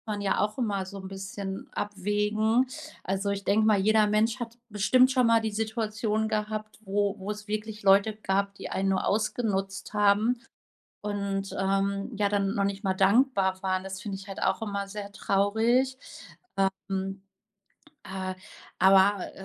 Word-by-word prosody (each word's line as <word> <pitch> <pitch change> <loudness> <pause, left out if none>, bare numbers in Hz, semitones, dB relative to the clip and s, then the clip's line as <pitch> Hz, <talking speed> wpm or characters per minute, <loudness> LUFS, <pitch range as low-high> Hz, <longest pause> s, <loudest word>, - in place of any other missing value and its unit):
man 205 - -5
ja 195 -1 +1
auch 210 +3 -1
immer 205 -6 -1
so 195 +1 -8
'n 190 - -7
bisschen 195 0 -6
abwägen. 210 +4 +1 0.4
Also, 195 +2 -1
ich 200 0 -3
denke 215 +2 +3
mal, 215 -2 +4
jeder 215 +2 +4
Mensch 215 +3 +2
hat 235 -1 -6
bestimmt 220 +5 +4
schon 255 -1 +3
mal 230 0 +5
die 220 -1 -2
Situation 220 0 -1
gehabt, 215 0 -3
wo 200 0 0
wo 195 +2 -4
es 210 0 -8
wirklich 215 0 -4
Leute 195 +2 +5
gab, 200 -1 -1
die - - -7
einen 195 +1 0
nur 190 -1 +1
ausgenutzt 205 -2 -1
haben 210 +4 +3 0.6
und, 200 -1 -3
ähm, 195 +2 0
ja 205 0 +2
dann 200 -1 +1
noch 200 - +1
nicht 195 0 -3
mal 190 -2 +1
dankbar 195 -1 +3
waren. 185 -1 0
Das 190 0 -6
finde 200 -2 -4
ich 195 +1 -11
halt 195 - -7
auch 190 +2 +1
immer 200 -2 -3
sehr 200 0 -6
traurig. 225 +8 +2 0.9
Ähm, 195 0 -3 0.8
äh, 190 -1 -4 0.4
aber, 195 +1 +5
205 Hz, 160 wpm, -28 LUFS, 195-215 Hz, 0.9 s, mal